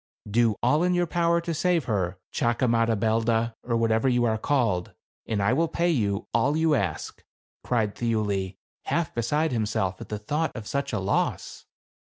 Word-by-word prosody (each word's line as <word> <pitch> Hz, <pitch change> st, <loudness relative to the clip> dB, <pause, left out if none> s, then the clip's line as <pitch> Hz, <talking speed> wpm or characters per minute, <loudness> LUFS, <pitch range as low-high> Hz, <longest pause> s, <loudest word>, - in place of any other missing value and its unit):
"Do 115 Hz, +1 st, +2 dB
all 150 Hz, +6 st, +3 dB
in 180 Hz, 0 st, +2 dB
your 175 Hz, 0 st, +2 dB
power 170 Hz, 0 st, +1 dB
to 170 Hz, 0 st, -3 dB
save 170 Hz, 0 st, +1 dB
her, 95 Hz, -5 st, -1 dB, 0.2 s
Chakamadabelda, 115 Hz, -1 st, +1 dB
or 115 Hz, -2 st, -1 dB
whatever 115 Hz, +2 st, +2 dB
you 120 Hz, -1 st, +2 dB
are 110 Hz, -1 st, 0 dB
called, 110 Hz, -10 st, 0 dB, 0.3 s
and 105 Hz, -3 st, 0 dB
I 105 Hz, +5 st, +3 dB
will 165 Hz, +5 st, +2 dB
pay 170 Hz, +2 st, +1 dB
you 105 Hz, -8 st, -1 dB
all 140 Hz, +6 st, +2 dB
you 160 Hz, -1 st, +3 dB
ask," 95 Hz, -, -2 dB, 0.4 s
cried 110 Hz, -4 st, 0 dB
Thiuli, 105 Hz, -5 st, -1 dB, 0.3 s
half 170 Hz, -2 st, -1 dB
beside 150 Hz, +7 st, 0 dB
himself 105 Hz, -5 st, -1 dB
at -, -, -9 dB
the 105 Hz, -, -3 dB
thought 150 Hz, +10 st, -2 dB
of 115 Hz, -4 st, -6 dB
such 140 Hz, +4 st, -2 dB
a 110 Hz, -, -1 dB
loss. 95 Hz, +1 st, -2 dB
115 Hz, 170 wpm, -26 LUFS, 105-150 Hz, 0.4 s, all